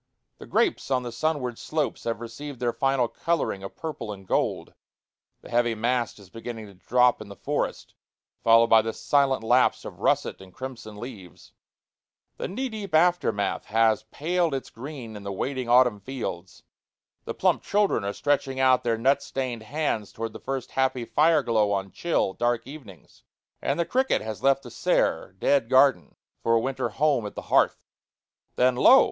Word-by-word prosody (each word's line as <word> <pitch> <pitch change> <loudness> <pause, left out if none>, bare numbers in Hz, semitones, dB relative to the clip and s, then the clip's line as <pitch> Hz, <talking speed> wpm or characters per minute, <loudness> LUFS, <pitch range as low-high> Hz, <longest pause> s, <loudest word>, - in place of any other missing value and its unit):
The - - -11
grapes 390 - +1
on 130 -2 +1
the 120 - -5
sunward 125 -2 -2
slopes 155 -1 -2
have 115 -1 -2
received 125 +4 -8
their 120 -1 0
final 135 -3 +1
coloring 165 -9 -1
of 95 - -8
purple 150 -9 -5
and 95 -2 -9
gold; - - -1 0.7
the - - -13
heavy 120 -1 +2
mast 120 +2 -1
is 100 -3 -16
beginning 115 -1 -7
to 100 - -13
drop 125 +6 +2
in 105 - -9
the 100 - -9
forest, - - -3 0.5
followed 115 0 +6
by 115 -1 +6
the 115 0 -4
silent 135 +2 +1
lapse 125 +3 +3
of - - -9
russet - - 0
and 95 -2 -15
crimson 120 -5 -8
leaves; 105 -5 -10 0.8
the - - -3
knee 260 +8 -3
deep 210 -8 -4
aftermath 170 - +2
has 110 0 +2
paled 170 +1 0
its 135 - -6
green 125 -3 -8
in 105 - -8
the 100 0 -5
waiting 130 +4 -3
autumn 125 -3 +5
fields; 100 -6 -6 0.6
the - - -5
plump - - +2
children 200 - +1
are 100 - -1
stretching 135 +2 -1
out 130 -1 +4
their 115 -2 +1
nut 135 +5 +2
stained 130 -4 -4
hands 115 -3 -2
towards 115 -1 -5
the - - -8
first 135 -2 -4
happy 130 -2 0
fire 155 +6 +3
glow 110 -3 +2
on 95 -1 -2
chill, 160 - 0
dark 120 +1 0
evenings; 125 - -13 0.4
and - - -1
the 170 - +2
cricket 260 - +1
has 110 -1 -6
left 135 0 +3
the 120 - -10
sere, 95 - 0
dead 130 +2 +2
garden 135 +1 +4 0.3
for 115 - +2
a - - +4
winter 130 0 -2
home 135 +1 +1
at - - -10
the - - -6
hearth. - - +3 0.7
Then, 125 0 +3
lo! 260 - +7
125 Hz, 175 wpm, -26 LUFS, 110-140 Hz, 0.8 s, lo